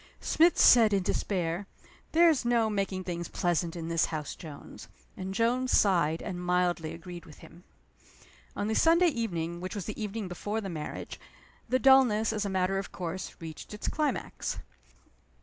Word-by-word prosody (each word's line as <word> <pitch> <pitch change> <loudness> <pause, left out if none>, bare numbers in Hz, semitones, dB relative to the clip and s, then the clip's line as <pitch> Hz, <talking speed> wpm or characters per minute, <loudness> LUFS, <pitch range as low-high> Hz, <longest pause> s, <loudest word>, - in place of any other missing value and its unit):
Smith 335 +2 +3
said, 225 -4 +7
in 195 -2 +2
despair, 180 -1 -2 0.4
"There's 325 -4 +4
no 235 -2 +2
making 195 -2 -2
things 175 -2 -4
pleasant 175 -2 -1
in 165 -1 -5
this 165 0 +2
house, 155 -2 -4
Jones." 155 -5 -11 0.3
And 190 0 -5
Jones 240 +5 +1
sighed, 170 -5 +3
and 180 -4 -5
mildly 175 -3 0
agreed 170 +1 -9
with 150 - -14
him. 175 +2 -16 0.9
On 205 - -2
the 220 - 0
Sunday 335 +6 +5
evening 175 - -3
which 185 +3 -5
was 200 - -4
the 215 - -6
evening 210 0 -4
before 205 +4 -3
the 200 -3 -5
marriage 155 -3 -6 0.5
the 255 - +3
dullness, 250 -5 +5
as 210 -1 -2
a - - -2
matter 190 0 0
of 195 - -7
course, 180 +1 -5
reached 165 +4 -8
its 210 - -5
climax. 300 -1 -2
190 Hz, 165 wpm, -29 LUFS, 170-225 Hz, 0.9 s, said